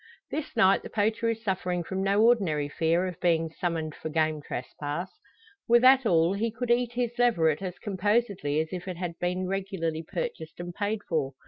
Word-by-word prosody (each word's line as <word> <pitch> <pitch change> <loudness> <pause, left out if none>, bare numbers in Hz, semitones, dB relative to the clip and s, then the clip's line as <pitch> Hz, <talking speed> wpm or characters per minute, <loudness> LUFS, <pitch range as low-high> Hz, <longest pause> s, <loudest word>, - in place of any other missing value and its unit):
This 310 0 -4
night 195 -4 +5
the - - -9
poacher 220 +2 0
is 225 0 -3
suffering 180 -3 -1
from 190 +3 -3
no 200 +2 +3
ordinary 180 -12 +2
fear 165 +4 +1
of 180 -2 -5
being 165 -2 +1
summoned 165 -3 -2
for 160 - -6
game 155 -1 0
trespass. 145 +7 -5 0.6
Were 235 +1 +6
that 260 0 +6
all, 170 -1 +3
he 220 +4 0
could 240 +2 -3
eat 240 0 +2
his 240 -1 -1
leveret 170 -10 +3
as 185 -2 -5
composedly 200 -6 0
as 160 - -4
if 180 0 -6
it 180 -2 -4
had 175 -2 -5
been 180 +1 -1
regularly 190 -4 -2
purchased 165 -2 -5
and 175 0 -6
paid 205 +2 -2
for. 145 -6 -1
185 Hz, 190 wpm, -28 LUFS, 165-220 Hz, 0.6 s, Were